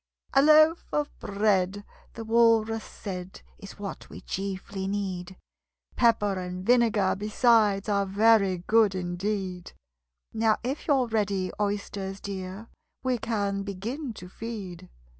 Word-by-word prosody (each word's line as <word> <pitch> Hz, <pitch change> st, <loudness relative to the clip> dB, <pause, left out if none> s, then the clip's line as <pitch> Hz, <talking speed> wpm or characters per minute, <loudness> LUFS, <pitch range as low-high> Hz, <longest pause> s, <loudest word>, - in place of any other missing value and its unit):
"A 275 Hz, -, +6 dB
loaf 310 Hz, +3 st, +5 dB
of 295 Hz, -1 st, -1 dB
bread," 200 Hz, -1 st, 0 dB, 0.3 s
the 225 Hz, -, -6 dB
Walrus 225 Hz, -1 st, +3 dB
said, 185 Hz, -2 st, -8 dB, 0.2 s
"Is 200 Hz, -, -11 dB
what 205 Hz, -1 st, -7 dB
we -, -, -10 dB
chiefly 195 Hz, 0 st, -4 dB
need: 190 Hz, -2 st, -4 dB, 0.6 s
Pepper 205 Hz, -4 st, +2 dB
and 180 Hz, 0 st, -6 dB
vinegar 225 Hz, -5 st, +3 dB
besides 210 Hz, -1 st, +3 dB
Are 200 Hz, -1 st, +1 dB
very 200 Hz, -1 st, +4 dB
good 220 Hz, -3 st, +4 dB
indeed 185 Hz, 0 st, -3 dB, 0.6 s
Now, 220 Hz, -1 st, +2 dB
if 265 Hz, +5 st, -4 dB
you're 275 Hz, -4 st, +3 dB
ready, 205 Hz, -5 st, -1 dB
Oysters 200 Hz, -1 st, -3 dB
dear, 195 Hz, +2 st, -6 dB, 0.4 s
We 255 Hz, -2 st, 0 dB
can 200 Hz, -3 st, -1 dB
begin 225 Hz, +9 st, -5 dB
to 180 Hz, -, -10 dB
feed." 185 Hz, -4 st, -7 dB
205 Hz, 120 wpm, -27 LUFS, 190-225 Hz, 0.6 s, A